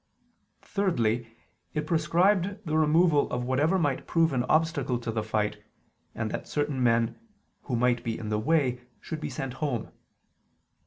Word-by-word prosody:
Thirdly, 120 - 0 0.5
it 150 0 -1
prescribed 180 +5 +2
the 155 -1 -1
removal 155 0 +4
of 125 0 -2
whatever 145 +9 +2
might 145 -6 -1
prove 165 -3 +2
an 125 - +1
obstacle 155 -4 +1
to 115 -1 -4
the 110 0 -1
fight, 105 -1 -1 0.5
and 110 -1 -2
that - - -5
certain 145 -3 -1
men, 115 -1 +2 0.5
who 125 - -1
might 120 0 +2
be 115 -1 -2
in 110 - -5
the 105 0 0
way, 130 -1 +1 0.2
should 155 -2 -6
be - - -3
sent 130 -1 -4
home. 135 -7 -2
140 Hz, 155 wpm, -28 LUFS, 120-160 Hz, 0.5 s, removal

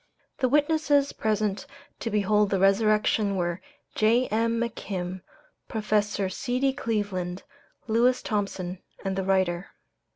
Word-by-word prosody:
The 255 - +2
witnesses 290 0 +2
present 210 -2 -1 0.3
to 230 - -3
behold 210 0 +2
the 195 - +1
resurrection 205 +1 +3
were 175 -1 -1 0.3
J.M. 230 0 +2
McKim, 190 -6 -4 0.5
Professor 210 -2 0
C.D. 250 +8 0
Cleveland, 200 -8 -2 0.4
Lewis 240 +3 +2
Thompson, 190 -4 -3 0.2
and 190 0 -1
the 190 - -1
writer. 185 -1 +1
210 Hz, 105 wpm, -26 LUFS, 190-230 Hz, 0.5 s, resurrection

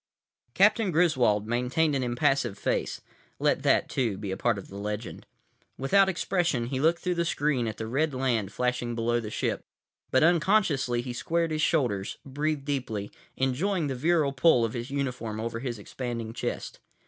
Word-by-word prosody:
———— - - -66
Captain 225 -5 +4
Griswold 130 - +2
maintained 125 +7 +1
an 135 - 0
impassive 120 -3 +1
face. - - -1 0.4
(Let - - +1
that, - - +3
too, 115 -7 -1
be 100 -2 -5
a - - -1
part 115 +1 +1
of 100 - -8
the 95 - -11
legend.) 105 +2 -5 0.5
Without 190 +9 +4
expression, 175 -8 0
he 130 +2 -3
looked 165 +4 +3
through 180 - +1
the 170 -1 0
screen 145 -7 0
at 110 - -4
the 110 - -4
red 140 +7 0
land 120 -6 0
flashing 125 0 -1
below 120 +1 +1
the 110 -2 -5
ship. - - -2 0.5
But 130 - +3
unconsciously 165 - +2
he 125 -1 -5
squared 165 +6 -1
his 155 0 -1
shoulders, 120 - 0
breathed 145 +1 -2
deeply, 120 -8 -3 0.3
enjoying 155 +8 0
the 140 - -2
virile 155 +1 +2
pull 135 -4 +4
of 115 - -4
his 120 +1 -5
uniform 125 -6 -3
over 115 0 -3
his 120 -2 -4
expanding 115 +1 -5
chest. - - -4
130 Hz, 175 wpm, -27 LUFS, 115-155 Hz, 0.5 s, Captain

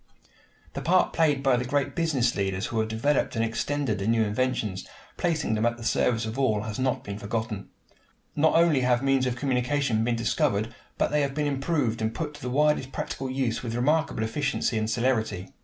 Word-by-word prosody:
The - - -4
part 180 +3 +3
played 150 -4 +2
by 135 -3 +4
the 120 - -1
great 140 +2 -1
business 145 -8 +1
leaders 95 0 -1
who 115 -2 -2
have 110 0 0
developed 125 +7 0
and 115 0 +1
extended 115 0 -1
the 100 - -2
new 115 0 +3
inventions, 110 -4 -1 0.3
placing 160 -9 0
them 110 0 0
at 120 0 +1
the 120 - -9
service 115 0 +1
of 110 +4 -4
all, 110 -6 +2
has 110 +1 -5
not 130 -1 0
been 100 0 -6
forgotten. 110 -1 -4 0.7
Not 155 +2 +3
only 165 -4 +4
have 125 0 +2
means 135 -1 +2
of 125 - -1
communication 125 -2 0
been 120 0 +1
discovered, 110 0 0 0.2
but - - +1
they 150 0 +2
have 140 -1 -1
been 150 0 0
improved 135 -5 0
and 110 +1 -1
put 150 -2 -3
to 145 - -12
the 125 - -3
widest 145 0 +2
practical 135 0 -4
use 130 -3 -1
with 115 -2 -4
remarkable 145 -1 +1
efficiency 140 +2 -1
and 110 0 0
celerity. 110 -6 -1
125 Hz, 200 wpm, -26 LUFS, 110-140 Hz, 0.7 s, by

